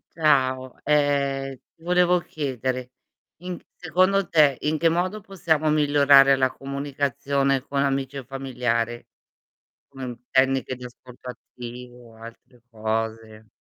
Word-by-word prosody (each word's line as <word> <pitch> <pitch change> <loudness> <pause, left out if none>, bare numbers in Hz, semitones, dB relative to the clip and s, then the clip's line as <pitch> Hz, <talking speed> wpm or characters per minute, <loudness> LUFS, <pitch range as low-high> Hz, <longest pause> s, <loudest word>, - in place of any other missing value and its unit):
Ciao, 130 -5 +1
ehm, 140 -2 +1 0.2
ti 165 - -23
volevo 180 0 +3
chiedere: 130 -5 -4 0.5
in 180 0 -5
c - - -19
secondo 185 +3 +1
te, 150 -6 +4
in 155 +1 0
che 165 +2 +3
modo 185 +5 -1
possiamo 160 -5 0
migliorare 145 -2 +5
la 130 -1 +1
comunicazione 140 0 -1
con 140 0 -2
amici 135 0 -1
o 135 - -6
familiare? 120 -3 -2 0.8
Come 135 -1 -9
un 120 -2 -6
tecniche 130 0 +2
di 125 - -11
ascolto 125 0 -12
attivo 120 0 -11
o - - -18
altre 115 +2 -14
cose? 110 0 -4
135 Hz, 130 wpm, -24 LUFS, 125-150 Hz, 0.8 s, migliorare